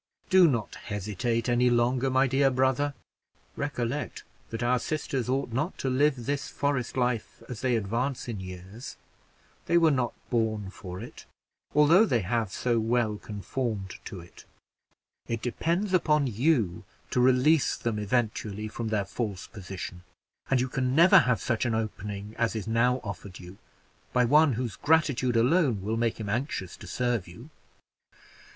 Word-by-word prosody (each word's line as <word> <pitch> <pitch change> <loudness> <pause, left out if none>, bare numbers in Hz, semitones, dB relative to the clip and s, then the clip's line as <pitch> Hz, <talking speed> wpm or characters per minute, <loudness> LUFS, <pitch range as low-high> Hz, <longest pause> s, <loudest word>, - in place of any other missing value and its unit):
Do 185 -2 +7
not 115 -8 -1
hesitate 110 +3 -2
any 125 0 +3
longer, 120 +2 +2
my 130 +1 +3
dear 135 +1 +3
brother; 130 +2 +1 0.6
recollect 140 -1 -3 0.3
that 115 +1 -4
our 125 +1 +2
sisters 135 -3 -2
ought 135 -1 0
not 150 +9 -1
to 135 - -1
live 135 -2 +2
this 140 +2 -2
forest 140 -4 -1
life 125 -2 -1
as 125 -4 -7
they 125 -2 +2
advance 115 +6 -2
in 115 -4 -4
years 95 +5 -9 0.7
they 170 - +4
were 165 -2 +5
not 125 -4 0 0.2
born 110 -4 0
for 90 -2 -8
it, 120 +4 -10 0.5
although 155 +7 +6
they 120 - +2
have 110 +1 -1
so 120 +1 0
well 110 -1 +1
conformed 105 -2 -4
to 95 - -7
it. 85 - -15 0.8
It 115 -1 -3
depends 170 - -1
upon 150 -5 +3
you 115 - +1 0.3
to 125 - +2
release 130 +4 +4
them 115 -3 -2
eventually 110 -1 -1
from 115 +1 -5
their 105 -2 0
false 100 -3 -4
position; 95 -3 -8 0.5
and 135 - +3
you 130 - +1
can 130 0 -1
never 170 +4 +8
have 125 -2 +2
such 120 -2 -1
an 120 -3 0
opening 105 -1 -4
as 115 -1 +1
is 110 - -3
now 125 +3 +2
offered 100 -2 -7
you, 90 +2 -12 0.5
by 125 -1 +4
one 150 +3 +5
whose 115 -1 -3
gratitude 145 -6 +2
alone 125 - +3
will 110 +3 -1
make 115 0 0
him 110 - -4
anxious 105 - -3
to - - -11
serve 120 -7 -1
you." 115 - -12
120 Hz, 160 wpm, -28 LUFS, 110-135 Hz, 0.8 s, never